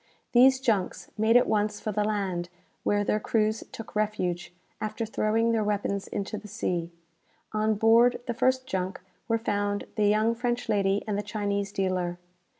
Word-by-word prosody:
These 260 +2 +6
junks 215 -8 -1
made 220 +2 +4
at 245 - +4
once 210 0 0
for 215 - -3
the 210 +1 0
land, 195 -5 -1 0.3
where 205 0 +2
their 210 - +1
crews 215 0 0
took 225 - -9
refuge, 205 -5 -1 0.3
after 215 +2 -2
throwing 225 +1 +1
their 225 -1 +1
weapons 200 -1 -1
into 205 +2 -4
the 210 - -11
sea. 175 -3 -2 0.6
On 215 0 +1
board 230 +3 +5
the 235 - -2
first 260 +2 +1
junk 190 -6 -3 0.3
were 230 -1 +2
found 205 -2 -1
the 210 -1 +3
young 215 +2 +3
French 240 +1 -2
lady 200 -1 +1
and 205 -1 -1
the - - 0
Chinese 200 -1 -2
dealer. 185 -3 -1
210 Hz, 165 wpm, -27 LUFS, 200-225 Hz, 0.6 s, These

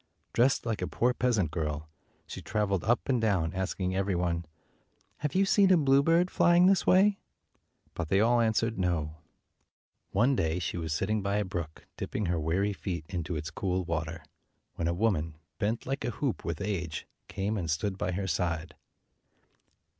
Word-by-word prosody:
Dressed 130 +2 +3
like 110 -2 -2
a - - -1
poor 125 +1 +1
peasant 110 -11 +1
girl, 75 -2 -3 0.4
she - - -8
traveled 100 -4 -1
up 120 +3 +1
and 125 -4 +1
down, 95 -7 +1
asking 95 0 -2
every 95 0 0
one, 85 -1 -1 0.4
" - - -41
Have 150 +1 -3
you 195 +1 +4
seen 195 0 +4
a 185 - +7
bluebird 160 +5 +3
flying 175 +1 +5
this 190 -1 +3
way?" 195 +2 +5 0.7
But 85 -3 -4
they 95 - +3
all 120 +2 +4
answered, 115 -1 +1
"No." 80 -4 -1 0.9
One 120 +7 +3
day, 80 -5 0
she 90 -2 -3
was 80 -2 -3
sitting 100 +7 0
by 100 +1 -1
a 105 0 +1
brook, 85 -4 -6
dipping 105 - -3
her 85 -1 0
weary 95 +6 0
feet 90 -4 -4
into 90 -2 -3
its 75 +1 -4
cool 95 +1 -1
water, 80 0 -3 0.5
when 85 - -2
a 85 - +1
woman, 85 -6 0 0.2
bent 110 +2 -1
like 135 -1 -3
a 120 - -1
hoop 125 +2 -2
with 85 -3 -4
age, 90 -6 -3 0.2
came 100 +3 -2
and 90 -6 -3
stood 95 +6 -1
by 90 -1 -2
her 95 +2 -2
side. 85 -2 -2
95 Hz, 175 wpm, -29 LUFS, 85-115 Hz, 0.9 s, a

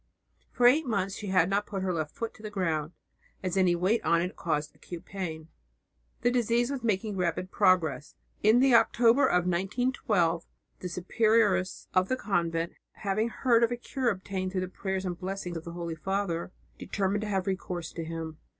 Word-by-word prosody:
For 245 - +1
eight 280 +4 +5
months 195 -4 0
she 205 - -6
had 185 -3 +3
not 200 +2 0
put 195 -2 -3
her 185 -1 0
left 155 -3 -3
foot 230 -1 -4
to - - -16
the 215 - -5
ground, 165 -6 -1 0.5
as 185 -1 -1
any 185 -2 +4
weight 195 +6 +1
on 170 - +3
it 180 +2 -2
caused 150 -2 -2
acute 175 -2 -9
pain. 165 -5 -5 0.7
The 245 - +3
disease 240 +1 +1
was 275 -2 -3
making 210 -2 0
rapid 180 +1 -1
progress. 160 -5 +2 0.3
In 220 +4 +5
the 265 -1 +5
October 230 +3 +5
of 180 0 +2
1912 185 -2 0 0.3
the 180 - -4
superioress 205 +1 +1
of 185 0 +2
the 255 - +1
convent, 170 -6 -1 0.2
having 215 +3 -1
heard 235 -1 +2
of 235 - +3
a 240 - -1
cure 250 +1 -1
obtained 185 -1 -3
through 185 - 0
the 185 - -2
prayers 190 0 -3
and 175 -2 -3
blessing 190 -2 -4
of 165 - -6
the 170 - -7
Holy 170 -1 -4
Father, 180 0 -2 0.3
determined 200 +1 -1
to 215 - -3
have 190 -2 0
recourse 180 -3 -3
to 165 - -5
him. 160 -1 -6
190 Hz, 185 wpm, -29 LUFS, 170-220 Hz, 0.7 s, eight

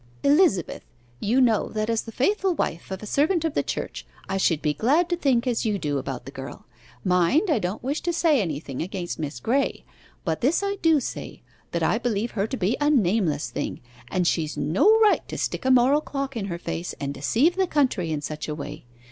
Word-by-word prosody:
'Elizabeth, 280 - +3 0.4
you 235 +6 +2
know 230 -5 +3
that 215 0 -2
as 230 -1 +1
the 225 - -9
faithful 375 - +1
wife 165 - -3
of 190 +1 -6
a - - -5
servant 315 - +1
of 320 - -1
the - - +2
Church, - - -4 0.2
I 195 - -1
should 165 -5 +2
be 150 -1 0
glad 285 - +2
to 350 - +1
think 270 -8 +1
as 245 -3 0
you 215 -3 0
do 145 -6 -1
about 130 -2 -5
the 135 - -8
girl. 135 -1 -9 0.4
Mind 180 - +3
I 290 - +3
don't 185 +4 -3
wish 280 +5 -2
to 345 - 0
say 325 -6 +3
anything 145 -6 -4
against 180 0 -4
Miss 145 -5 -4
Graye, 265 - 0 0.4
but 160 -3 -1
this 305 +10 +2
I 400 0 -1
do 325 -2 +4
say, 245 - -6 0.3
that 170 -1 -2
I 215 +7 +2
believe 230 -1 -1
her 200 0 -1
to 260 - -4
be 200 +3 +1
a 290 - +3
nameless 180 - +1
thing, - - -4 0.3
and 180 -1 0
she's 160 -3 0
no 185 - +3
right 425 -2 +5
to - - -6
stick - - -3
a - - +3
moral 260 +3 +5
clock 275 -3 -4
in 215 -4 -2
her 175 -3 -4
face, 170 0 -4
and 140 0 -3
deceive 235 - +2
the 380 -1 +1
country 255 - +1
in 150 -2 -2
such 150 +1 -5
a 150 - -3
way. 145 - -7
220 Hz, 220 wpm, -25 LUFS, 170-280 Hz, 0.4 s, right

